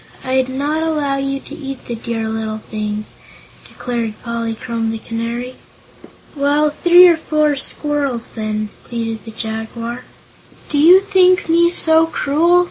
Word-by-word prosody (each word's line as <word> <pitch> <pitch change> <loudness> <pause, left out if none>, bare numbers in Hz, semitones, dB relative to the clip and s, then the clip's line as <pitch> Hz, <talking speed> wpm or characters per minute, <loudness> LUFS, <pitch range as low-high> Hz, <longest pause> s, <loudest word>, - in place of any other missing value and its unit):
I'd 260 0 0
not 290 +4 -1
allow 300 -4 0
you 275 0 -2
to - - -11
eat 275 -4 -7
the 240 - -5
dear 230 -1 -4
little 220 -1 -3
things," 215 -1 -5 0.5
declared 235 -3 -4
Polychrome 230 0 -3
the 225 - -3
Canary. 235 +3 -5 0.8
"Well, 290 +1 +2
three 350 +3 +7
or 340 -2 +4
four 305 -2 +1
squirrels, 280 -3 -3
then," 215 -1 -3
pleaded 225 -2 -5
the - - -8
Jaguar. 225 +2 -5 0.6
"Do 290 - 0
you 355 +5 +7
think 370 -2 +3
me 340 +1 +4
so 325 -2 +5
cruel?" 325 +3 +2
260 Hz, 135 wpm, -18 LUFS, 225-305 Hz, 0.8 s, three